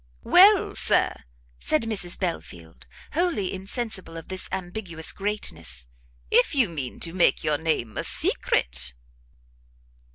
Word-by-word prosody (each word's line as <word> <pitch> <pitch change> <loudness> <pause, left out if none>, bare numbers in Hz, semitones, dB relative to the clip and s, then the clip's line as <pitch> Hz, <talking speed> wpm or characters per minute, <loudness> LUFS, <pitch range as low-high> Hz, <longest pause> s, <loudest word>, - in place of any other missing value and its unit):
"Well, 390 +2 +6
Sir," - - +2 0.5
said 155 - +1
Mrs 200 -6 0
Belfield, 85 - -5 0.3
wholly 300 - 0
insensible 190 -3 -3
of 165 - -10
this 185 0 -2
ambiguous 175 -3 -3
greatness, 85 - -4 0.4
"if 165 - +4
you 250 -8 +4
mean 140 -7 -5
to 165 - -3
make 180 -1 +3
your 150 -1 +1
name 155 -9 -1
a - - -1
secret." 65 +1 0
175 Hz, 120 wpm, -25 LUFS, 130-210 Hz, 0.5 s, Well